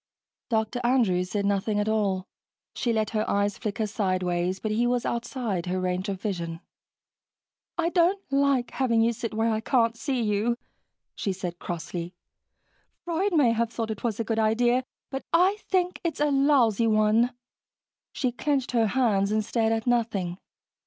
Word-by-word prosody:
Dr. 225 +1 0
Andrews 210 -8 +2
said 200 0 -1
nothing 205 +1 +1
at 205 - 0
all. 200 -4 0 0.5
She 240 - -1
let 220 -1 0
her 215 -1 0
eyes 200 0 0
flicker 220 0 -2
sidewise, 185 -3 -1
but 215 - -3
he 235 +3 +2
was 245 -1 0
outside 235 -6 -2
her 185 +1 -1
range 185 +2 -1
of 195 -2 -3
vision. 170 -5 -3 1.2
"I 335 -1 +1
don't 350 +3 +3
LIKE 275 -3 +2
having 235 -4 +2
you 230 +1 +3
sit 230 0 -4
where 225 +1 +2
I 220 - 0
can't 230 -1 +2
see 260 +2 -2
you," 215 +3 +1 0.6
she 200 - -2
said 180 -2 -5
crossly. 175 +1 -5 0.9
"Freud 350 +3 0
may 270 -7 +5
have 230 0 0
thought 225 -1 -3
it 215 - -6
was 230 -3 -1
a - - +1
good 225 0 -1
idea, 240 +3 +2 0.3
but 270 -1 -4
I 370 +4 +4
think 365 -1 +1
it's 330 -5 -2
a 295 0 +2
lousy 265 -6 +3
one." 215 +3 +3 0.8
She 255 - -1
clenched 270 +1 -1
her 230 -3 +3
hands 210 -4 +2
and 215 0 +1
stared 225 -1 +1
at 225 -1 -1
nothing. 215 -7 0
225 Hz, 165 wpm, -26 LUFS, 200-245 Hz, 1.2 s, may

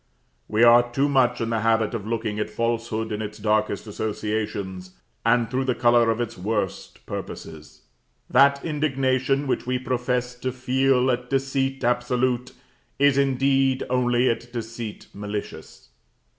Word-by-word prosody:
We 110 +2 +2
are 120 +1 +6
too 135 +4 +1
much 125 -4 +2
in 115 0 -1
the 115 - +1
habit 115 0 +1
of 105 -3 -4
looking 110 -2 -2
at 105 - -2
falsehood 115 0 -2
in 105 0 -3
its 105 0 -6
darkest 105 -1 0
associations, 105 -3 -4 0.3
and 120 0 +3
through 130 +3 -1
the 125 -2 0
color 120 -1 +4
of 115 0 0
its 120 -3 -4
worst 105 0 -3
purposes. - - -8 0.4
That 140 +2 +4
indignation 135 -3 0
which 130 - -2
we 125 0 +1
profess 125 0 -1
to 130 +1 -2
feel 130 0 +2
at 125 0 -3
deceit 135 0 -1
absolute, 125 +1 0 0.5
is 140 -1 +4
indeed 135 -1 +2
only 125 0 +2
at 120 0 -2
deceit 115 -2 -6
malicious. 105 -9 -7
120 Hz, 145 wpm, -24 LUFS, 110-130 Hz, 0.5 s, are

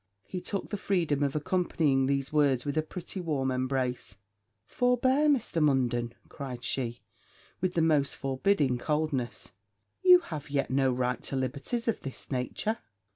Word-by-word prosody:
He 180 - -5
took 200 +1 -4
the 205 - -1
freedom 170 -8 0
of 140 -1 0
accompanying 150 -4 +1
these 140 +1 -1
words 140 -5 +3
with 145 - -2
a 155 - +3
pretty 180 +4 -7
warm 140 -6 0
embrace. 130 -5 -2 0.5
'Forbear, 255 - +2
Mr. 235 - +1
Munden,' 120 -5 +1
cried 130 -4 -7
she, 120 -3 -2 0.6
with 185 0 -1
the 165 - +3
most 150 -4 +2
forbidding 135 -1 +1
coldness; 150 -6 -2 0.5
'you 360 -1 +8
have 155 - -7
yet 140 -2 0
no 135 0 +3
right 125 0 -1
to - - -5
liberties 140 - -2
of 230 - 0
this 135 +1 -8
nature.' 140 - -1
140 Hz, 150 wpm, -29 LUFS, 130-180 Hz, 0.6 s, you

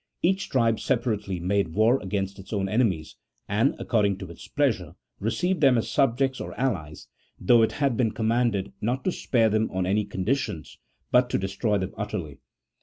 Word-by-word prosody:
Each 190 +2 +1
tribe 115 -4 +2
separately 105 -6 -1
made 90 -2 0
war 115 +5 +4
against 95 0 -3
its 95 - -12
own 100 -3 -1
enemies, 95 -7 0 0.3
and, 110 +7 +2
according 100 -4 +1
to 95 -3 -8
its - - -12
pleasure, - - 0 0.2
received 170 - -1
them 135 -4 +5
as 115 - -2
subjects 135 +1 +1
or - - -7
allies, 80 - -2 0.3
though 115 +5 +5
it 110 - +2
had 140 -5 0
been 120 -3 +2
commanded 110 -3 0
not 125 +5 -1
to 185 - +1
spare 115 -9 +1
them 110 +1 +1
on 95 -1 -1
any 100 +3 +1
conditions, 100 - -3 0.3
but 125 0 +4
to - - +1
de 95 - -2
stroy 100 +2 0
them 95 0 -4
utterly. 90 -10 -5
110 Hz, 180 wpm, -26 LUFS, 95-125 Hz, 0.3 s, them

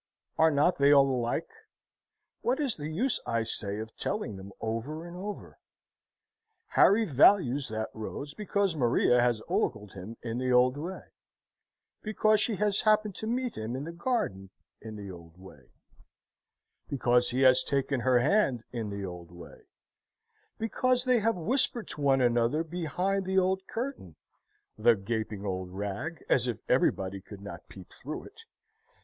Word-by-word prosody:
Are 160 - +5
not 150 +3 +2
they 140 +1 +5
all 140 -1 +6
alike? 120 -3 -1 0.9
What 255 +4 0
is 275 -6 +1
the 150 -1 -6
use, 220 +12 0
I 115 -1 0
say, 100 -2 -2
of 110 +1 -7
telling 210 - -3
them 95 +1 -10
over 120 +9 -4
and 175 0 -9
over? 200 +3 -7 1.1
Harry 220 +3 +5
values 140 - +4
that 110 0 -4
rose 140 +6 -6
because 200 -2 0
Maria 120 -2 +3
has 120 -2 +1
ogled 105 -1 -1
him 100 +4 -9
in 115 +1 -3
the 130 0 0
old 125 +1 +4
way; 170 +6 -6 1.0
because 215 0 +2
she 225 - +1
has 205 0 +2
happened 215 -2 +2
to 220 - -4
meet 245 +1 -1
him 110 +3 -4
in 135 - -4
the 165 - -6
garden 170 - -2 0.3
in 110 0 -8
the 100 -2 -7
old 85 -1 -13
way; 95 +1 -15 1.2
because 125 -3 +2
he 125 +2 -1
has 130 -1 +6
taken 140 -1 0
her 125 +1 +3
hand 140 - +2
in 115 -4 -4
the 100 -1 -5
old 90 -2 -8
way; 85 -1 -14 0.9
because 250 +3 +1
they 255 -2 +3
have 225 +2 +1
whispered 240 - +1
to 150 - -5
one 135 -2 +3
another 120 +5 +2
behind 180 +4 -2
the 190 0 -1
old 190 0 +1
curtain 230 - -5 0.6
(the 115 +1 +5
gaping 105 0 -4
old 95 -2 -3
rag, 100 - -5
as 125 -1 +2
if 120 -4 -2
everybody 95 0 +1
could 100 +1 -12
not 100 -3 -10
peep 95 -2 -13
through 150 +4 -7
it!) 430 +2 -15
135 Hz, 160 wpm, -29 LUFS, -, 1.2 s, all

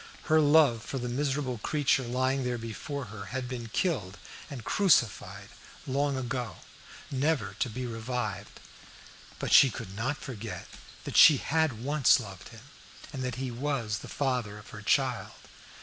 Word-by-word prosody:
Her 155 -1 +4
love 145 -6 +5
for 135 - -5
the 125 -1 -3
miserable 135 -1 -1
creature 145 +2 +1
lying 130 +2 0
there 125 -1 -1
before 125 +5 -5
her 100 -2 -7
had 130 +2 -4
been 120 -2 -5
killed 120 - -1 0.3
and 130 -5 -7
crucified 160 - +2 0.4
long 140 +1 0
ago, 125 -5 -3 0.6
never 135 -7 0
to 125 - 0
be 125 +3 -5
revived. 115 -3 -4 0.8
But - - -2
she 135 - +9
could 105 -5 -8
not 130 +7 -1
forget 115 -4 -7 0.4
that - - -3
she 150 - +9
had 145 -6 0
once 145 -1 +4
loved 95 -6 -9
him, 115 -2 -13 0.5
and 135 - -4
that 125 -2 -3
he 130 -1 -4
was 120 -4 -2
the - - -10
father 125 -7 -2
of 105 - -13
her - - -9
child. - - +1
125 Hz, 155 wpm, -29 LUFS, 115-140 Hz, 0.8 s, she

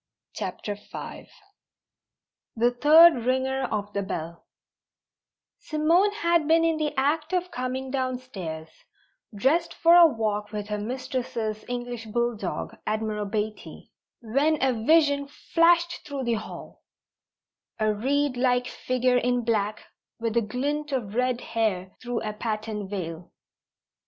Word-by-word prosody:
CHAPTER 205 - -4
V 205 +1 -9 1.3
THE 240 +2 +3
THIRD 300 +1 +7
RINGER 260 +1 0
OF 205 -3 -3
THE 200 - -1
BELL 170 -3 -5 1.2
Simone 330 +6 +2
had 340 -6 +1
been 330 +1 +4
in 325 -1 +2
the 305 -1 -2
act 305 +5 0
of 360 0 0
coming 255 +1 -3
downstairs, 250 - -4 0.7
dressed 290 +11 +1
for 335 +1 +5
a 345 -1 +9
walk 210 -6 -2
with 210 -1 -5
her 210 0 -2
mistress's 240 -2 -3
English 240 -2 -4
bulldog, 235 0 -2
Admiral 215 -1 -1
Beatty, 215 +1 -5 0.3
when 275 +7 +1
a 265 -1 +2
vision 285 +4 +3
flashed 335 +3 +2
through 280 -2 -5
the 235 -1 0
hall: 215 -1 -7 1.0
a 215 -1 +2
reedlike 250 +1 +1
figure 255 0 0
in 245 0 +1
black 215 -2 -1 0.3
with 230 -1 -2
a 235 - +4
glint 285 +7 -2
of 230 -7 -2
red 250 +1 0
hair 205 -5 -1
through 245 -1 -3
a 215 -1 -3
patterned 215 -2 -4
veil. 175 -4 -5
245 Hz, 125 wpm, -26 LUFS, 215-285 Hz, 1.3 s, a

